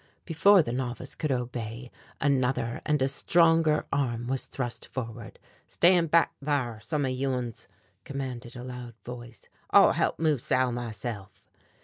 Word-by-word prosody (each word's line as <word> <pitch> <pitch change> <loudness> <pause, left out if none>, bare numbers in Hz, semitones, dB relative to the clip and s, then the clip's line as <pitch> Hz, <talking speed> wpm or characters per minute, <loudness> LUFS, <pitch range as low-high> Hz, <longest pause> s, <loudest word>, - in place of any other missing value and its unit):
Before 180 +3 +5
the 120 - -4
novice 125 0 -4
could 155 - -2
obey 120 -1 -4 0.3
another 130 -4 0
and 150 -1 +2
a - - +3
stronger 165 +2 +3
arm 120 -4 -1
was 130 +1 -1
thrust 125 -4 -5
forward. 115 -4 -7 0.3
"Stand 175 -2 +3
back 165 +2 +4
thar, 130 -6 -1
some 145 +6 -1
of 130 - -1
you 135 +2 -1
uns," 125 -3 -4 0.4
commanded 130 -4 -6
a 125 - -7
loud 125 -2 -8
voice, 120 -1 -10 0.2
"I'll - - +7
holp - - 0
move 155 -6 +1
Sal 130 0 +1
myself." 110 -4 -6
130 Hz, 145 wpm, -28 LUFS, 120-145 Hz, 0.4 s, I'll